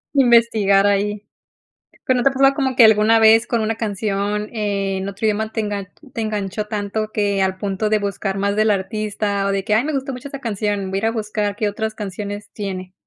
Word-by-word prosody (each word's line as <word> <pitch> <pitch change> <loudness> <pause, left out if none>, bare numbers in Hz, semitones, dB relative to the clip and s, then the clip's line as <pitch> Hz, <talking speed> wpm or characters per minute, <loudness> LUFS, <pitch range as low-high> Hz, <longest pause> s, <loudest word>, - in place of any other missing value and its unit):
Investigar 230 -6 +4
ahi. 205 +1 0 0.8
¿Pero 255 - +2
no 245 - 0
te 275 - +5
ha - - -5
pasado 270 +1 +4
como 265 -2 -1
que 235 -2 +8
alguna 220 +1 +5
vez 225 +1 +5
con 235 -2 0
una 220 +1 0
canción 210 -1 -2
en 200 -3 -2
otro 200 +3 -5
idioma 215 0 0
te 220 - -1
engan 205 -2 -4 0.3
te 230 - -3
enganchó 210 -1 -3
tanto 215 0 -2
que 200 -2 0
al 190 0 0
punto 200 +1 -2
de 215 - +3
buscar 200 -1 -3
más 200 +1 0
del 215 +1 +2
artista, 205 0 -1
o - - +1
de 195 0 -1
que: 210 +1 0
"Ay, 225 +4 +3
me 310 - -2
gustó 275 0 -2
mucho 250 +2 -7
esa 275 0 -7
canción, 205 -4 -2
voy 195 - -1
a - - +1
ir 220 - -2
a - - +1
buscar 210 -2 -2
qué 210 0 0
otras 220 +1 -4
canciones 205 0 -6
tiene"? 185 -3 -5
210 Hz, 220 wpm, -20 LUFS, 200-220 Hz, 0.8 s, que